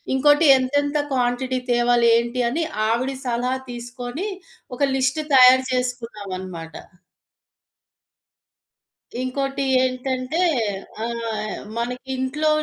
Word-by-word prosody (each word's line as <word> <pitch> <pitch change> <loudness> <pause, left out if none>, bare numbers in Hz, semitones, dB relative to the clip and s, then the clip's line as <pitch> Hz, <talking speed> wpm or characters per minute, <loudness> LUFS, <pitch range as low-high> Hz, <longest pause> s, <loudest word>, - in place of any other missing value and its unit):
ఇంకోటి, 295 +4 +4
ఎంతెంత 285 +3 0 0.2
క్వాంటిటీ 255 +1 0
తేవాలి, 240 0 +3
ఏంటి 235 +2 -1
అని, 320 +7 -1 0.2
ఆవిడి 255 +4 0
సలహా 245 +1 0 0.2
తీసుకొని, 245 - -6 0.5
ఒక 250 - -11 0.2
లిస్ట్ 265 +4 +1
తయారు 260 0 +7
చేసుకున్నామనమాట. 200 -10 -4 2.5
ఇంకోటి 275 +2 -2 0.2
ఏంటంటే, 255 +3 -2 0.7
ఆహ్, 230 -2 -4 0.2
మనకింట్లో 260 +5 -2
255 Hz, 80 wpm, -22 LUFS, 235-265 Hz, 2.5 s, తయారు